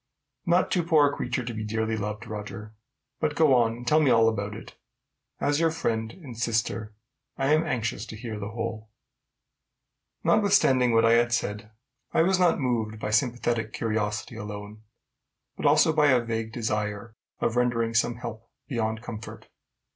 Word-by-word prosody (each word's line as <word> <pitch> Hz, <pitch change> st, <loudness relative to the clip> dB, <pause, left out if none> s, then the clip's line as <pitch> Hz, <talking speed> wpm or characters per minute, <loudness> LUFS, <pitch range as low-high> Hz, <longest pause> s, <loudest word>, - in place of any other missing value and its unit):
"Not 175 Hz, +2 st, +3 dB
too 180 Hz, -, +2 dB
poor 155 Hz, -4 st, +4 dB
a -, -, -8 dB
creature 125 Hz, 0 st, -2 dB
to 120 Hz, -, -4 dB
be 110 Hz, 0 st, -4 dB
dearly 110 Hz, +1 st, -1 dB
loved, 105 Hz, 0 st, -4 dB
Roger. 105 Hz, 0 st, -7 dB, 0.5 s
But 150 Hz, -1 st, 0 dB
go 155 Hz, -3 st, +5 dB
on 115 Hz, -3 st, +3 dB
and 120 Hz, +1 st, -10 dB
tell 155 Hz, +3 st, +5 dB
me 150 Hz, -4 st, +3 dB
all 115 Hz, -2 st, +5 dB
about 105 Hz, -1 st, -1 dB
it. -, -, -10 dB, 0.7 s
As 145 Hz, +1 st, +1 dB
your 165 Hz, 0 st, +3 dB
friend 115 Hz, -8 st, -2 dB
and 140 Hz, -10 st, -11 dB
sister, 110 Hz, -2 st, -2 dB, 0.4 s
I 135 Hz, +2 st, +2 dB
am 155 Hz, +1 st, +3 dB
anxious 115 Hz, -, -2 dB
to -, -, -8 dB
hear 110 Hz, -1 st, -6 dB
the 100 Hz, -, -4 dB
whole." 110 Hz, -1 st, -5 dB, 1.3 s
Notwithstanding 135 Hz, -, +4 dB
what 115 Hz, 0 st, +4 dB
I 115 Hz, -, +5 dB
had 120 Hz, +1 st, +4 dB
said, 105 Hz, -2 st, -2 dB, 0.4 s
I -, -, +4 dB
was 185 Hz, +1 st, +2 dB
not 175 Hz, -3 st, +3 dB
moved 115 Hz, -5 st, -1 dB
by 105 Hz, -, -3 dB
sympathetic 115 Hz, -1 st, 0 dB
curiosity 110 Hz, 0 st, -2 dB
alone, 105 Hz, 0 st, -7 dB, 0.7 s
but -, -, 0 dB
also 150 Hz, +2 st, +5 dB
by 150 Hz, -1 st, +4 dB
the 120 Hz, -, -2 dB
vague 115 Hz, -1 st, -3 dB
desire 105 Hz, -1 st, -3 dB, 0.2 s
of 115 Hz, -, 0 dB
rendering 120 Hz, -2 st, +1 dB
some 115 Hz, +1 st, +2 dB
help 115 Hz, -1 st, -8 dB, 0.2 s
beyond 110 Hz, -4 st, -2 dB
comfort. 110 Hz, -2 st, -8 dB
115 Hz, 170 wpm, -26 LUFS, 110-130 Hz, 1.3 s, go